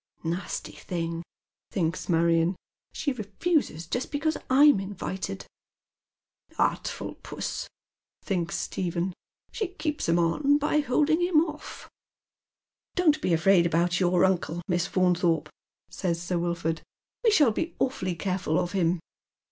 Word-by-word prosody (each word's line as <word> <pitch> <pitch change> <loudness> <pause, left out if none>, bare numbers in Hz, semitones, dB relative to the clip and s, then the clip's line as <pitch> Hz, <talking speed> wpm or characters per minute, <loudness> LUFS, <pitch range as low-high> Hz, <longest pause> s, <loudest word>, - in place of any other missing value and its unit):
" - - -35
Nasty 170 +3 -3
thing," 165 -2 -4 0.5
thinks 165 -1 -2
Marion, 165 +1 +3 0.2
*' - - -66
she 285 - -2
refuses 245 - -1
just 245 +10 -3
because 310 +2 0
I'm 280 -3 +6
invited." 195 0 -5 1.1
"Artful - - -1
puBS," - - -4 0.6
thinks 175 -4 -1
Stephen, 180 0 -2 0.4
"she 430 - -2
keeps 305 - -3
him 170 - +4
on 275 - +3
by 300 +1 +1
holding 300 +4 +2
him 350 -3 +4
off." 305 -2 -8 0.6
" - - -59
Don't 310 -4 +3
be 185 - 0
afraid 170 +1 +5
about 175 +1 +1
your 180 0 +4
uncle, 175 -2 0
Miss 175 -1 +1
Faunthorpe," 180 -2 +2 0.5
Bays 170 -4 0
Sir 175 0 -1
Wilford, 170 -2 -1 0.4
"we 465 - +5
shall 295 - +5
be 325 +10 -3
awfully 185 -9 -1
careful 180 -3 -1
of 175 - -1
him." 175 -2 +1
185 Hz, 130 wpm, -27 LUFS, 170-285 Hz, 1.1 s, I'm